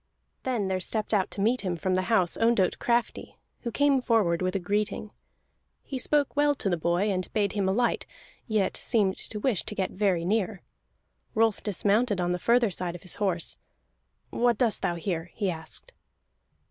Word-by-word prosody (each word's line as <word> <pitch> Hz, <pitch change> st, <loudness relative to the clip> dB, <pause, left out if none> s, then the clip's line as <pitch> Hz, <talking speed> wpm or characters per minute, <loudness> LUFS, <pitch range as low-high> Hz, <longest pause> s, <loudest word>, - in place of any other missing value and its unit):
Then 240 Hz, -7 st, -1 dB
there 190 Hz, -1 st, 0 dB
stepped 215 Hz, +4 st, -3 dB
out 195 Hz, -3 st, +2 dB
to 200 Hz, -, -5 dB
meet 235 Hz, +5 st, +2 dB
him 180 Hz, -3 st, -2 dB
from 185 Hz, +3 st, -1 dB
the 185 Hz, -, +2 dB
house 185 Hz, -7 st, +3 dB
Ondott 225 Hz, -5 st, +2 dB
Crafty, 235 Hz, 0 st, -1 dB, 0.2 s
who 240 Hz, -, -4 dB
came 280 Hz, +1 st, +3 dB
forward 210 Hz, -9 st, +2 dB
with 185 Hz, +1 st, -1 dB
a -, -, +2 dB
greeting. 205 Hz, +3 st, -2 dB, 0.7 s
He 265 Hz, -, -5 dB
spoke 290 Hz, +2 st, +1 dB
well 290 Hz, 0 st, +3 dB
to 195 Hz, -, -1 dB
the -, -, +3 dB
boy, 175 Hz, +5 st, +1 dB
and 185 Hz, -1 st, -3 dB
bade 205 Hz, -3 st, +1 dB
him 195 Hz, -2 st, 0 dB
alight, 235 Hz, +5 st, +1 dB, 0.4 s
yet 215 Hz, -4 st, +1 dB
seemed 200 Hz, -5 st, +1 dB
to 210 Hz, -, -5 dB
wish 230 Hz, -3 st, +1 dB
to 210 Hz, -, -6 dB
get 190 Hz, -2 st, -1 dB
very 185 Hz, -4 st, +1 dB
near. 200 Hz, 0 st, 0 dB, 0.7 s
Rolf 225 Hz, -1 st, +2 dB
dismounted 205 Hz, +1 st, +1 dB
on 175 Hz, 0 st, 0 dB
the 180 Hz, -, -1 dB
further 235 Hz, +1 st, +3 dB
side 175 Hz, 0 st, -3 dB
of 175 Hz, -, -10 dB
his 180 Hz, -, -2 dB
horse. 180 Hz, -4 st, -1 dB, 0.7 s
"What 240 Hz, -2 st, +2 dB
doest 230 Hz, -3 st, +1 dB
thou 175 Hz, -, 0 dB
here?" 170 Hz, -1 st, -3 dB
he 200 Hz, -4 st, 0 dB
asked. 160 Hz, -1 st, -4 dB
205 Hz, 185 wpm, -27 LUFS, 185-230 Hz, 0.7 s, house